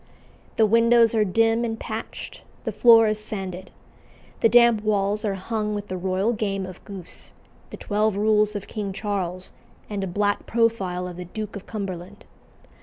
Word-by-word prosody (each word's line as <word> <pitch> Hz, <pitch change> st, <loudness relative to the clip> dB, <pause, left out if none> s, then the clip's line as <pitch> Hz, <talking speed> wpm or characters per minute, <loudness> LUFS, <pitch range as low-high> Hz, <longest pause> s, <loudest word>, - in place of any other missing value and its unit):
The 220 Hz, -, +4 dB
windows 230 Hz, +1 st, +4 dB
are 220 Hz, -2 st, +3 dB
dim 225 Hz, +4 st, +2 dB
and 225 Hz, -1 st, -3 dB
patched; 220 Hz, -1 st, -6 dB, 0.2 s
the -, -, -2 dB
floor 230 Hz, -2 st, +7 dB
is 215 Hz, 0 st, 0 dB
sanded. 190 Hz, -3 st, -6 dB, 0.7 s
The 230 Hz, -, +4 dB
damp 235 Hz, -2 st, +5 dB
walls 210 Hz, 0 st, 0 dB
are 205 Hz, -3 st, -1 dB
hung 210 Hz, +2 st, -3 dB
with 205 Hz, 0 st, -6 dB
the 185 Hz, -, -3 dB
royal 190 Hz, +5 st, 0 dB
game 195 Hz, -3 st, -2 dB
of 185 Hz, -1 st, -11 dB
goose, 195 Hz, -4 st, -10 dB, 0.4 s
the -, -, -8 dB
twelve 210 Hz, 0 st, 0 dB
rules 210 Hz, 0 st, +2 dB
of 200 Hz, -, -4 dB
King 205 Hz, -3 st, -5 dB
Charles, 185 Hz, -3 st, -3 dB, 0.4 s
and 200 Hz, -1 st, -2 dB
a -, -, -2 dB
black 205 Hz, +3 st, -1 dB
profile 200 Hz, -6 st, 0 dB
of 175 Hz, -1 st, -8 dB
the 180 Hz, -, -6 dB
Duke 215 Hz, +4 st, -6 dB
of 200 Hz, -, -9 dB
Cumberland. 195 Hz, -2 st, -6 dB
210 Hz, 170 wpm, -24 LUFS, 190-225 Hz, 0.7 s, floor